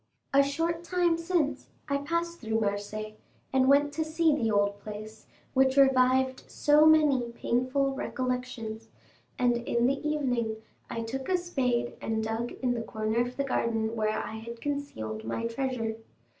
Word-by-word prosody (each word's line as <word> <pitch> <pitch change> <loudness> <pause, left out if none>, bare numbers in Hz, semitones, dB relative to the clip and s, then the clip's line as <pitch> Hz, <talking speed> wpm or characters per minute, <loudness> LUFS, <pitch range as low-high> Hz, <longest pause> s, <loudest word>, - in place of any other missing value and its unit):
A 280 - +7
short 330 +4 -1
time 350 -1 +2
since 335 -3 -1 0.2
I 280 -1 +1
passed 335 +4 -2
through 220 -1 -1
Marseilles, 215 +1 -3 0.4
and 260 0 +4
went 290 +1 +4
to 315 - 0
see 315 -1 +2
the 230 -6 0
old 205 -1 +1
place, 215 +1 -9 0.3
which 265 0 +3
revived 260 -1 +4
so 300 +1 +5
many 290 -6 +4
painful 255 +4 0
recollections; 250 -4 -3 0.5
and 245 -1 +3
in 235 0 0
the 275 +2 +1
evening 245 -7 0 0.3
I 230 - -3
took 260 +4 -5
a 370 - +3
spade 255 -9 -1
and 220 0 -1
dug 225 +2 -2
in 250 -1 +2
the 235 - -2
corner 220 0 -2
of 245 +1 -3
the 280 - +1
garden 225 -4 0
where 215 -1 0
I 220 - -4
had 235 +1 -8
concealed 230 - -4
my 115 - -3
treasure. 230 -2 -2
250 Hz, 155 wpm, -29 LUFS, 225-285 Hz, 0.5 s, A